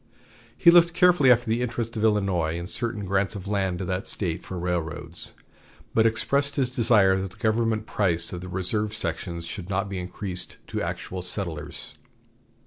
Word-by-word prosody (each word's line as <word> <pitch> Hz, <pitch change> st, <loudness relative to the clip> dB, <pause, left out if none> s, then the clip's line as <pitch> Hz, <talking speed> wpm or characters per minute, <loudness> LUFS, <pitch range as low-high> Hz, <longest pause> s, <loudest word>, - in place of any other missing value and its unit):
He 170 Hz, -, +7 dB
looked 170 Hz, -1 st, +6 dB
carefully 180 Hz, -7 st, +6 dB
after 120 Hz, 0 st, +4 dB
the 115 Hz, +2 st, +1 dB
interests 120 Hz, -1 st, -3 dB
of 110 Hz, -, -2 dB
Illinois 95 Hz, -7 st, +1 dB
in 85 Hz, -, -5 dB
certain 105 Hz, +1 st, -2 dB
grants 100 Hz, +2 st, 0 dB
of 100 Hz, -1 st, -7 dB
land 95 Hz, -3 st, 0 dB
to 95 Hz, -, -4 dB
that 95 Hz, +2 st, -3 dB
State 90 Hz, -3 st, -1 dB
for 95 Hz, -, -6 dB
railroads, 85 Hz, -2 st, -3 dB, 0.6 s
but 115 Hz, 0 st, +5 dB
expressed 140 Hz, +6 st, 0 dB
his 130 Hz, -3 st, +1 dB
desire 105 Hz, -6 st, +4 dB
that 95 Hz, -, -4 dB
the 90 Hz, -, -19 dB
government 110 Hz, -1 st, +1 dB
price 85 Hz, -6 st, +1 dB
of 90 Hz, -, -5 dB
the 90 Hz, -, -7 dB
reserved 105 Hz, +4 st, -1 dB
sections 85 Hz, -5 st, -4 dB
should 90 Hz, +1 st, -7 dB
not 100 Hz, +1 st, -1 dB
be 95 Hz, -2 st, -3 dB
increased 90 Hz, 0 st, -5 dB
to -, -, -4 dB
actual 95 Hz, 0 st, -4 dB
settlers. 85 Hz, -4 st, -6 dB
100 Hz, 175 wpm, -26 LUFS, 90-115 Hz, 0.6 s, He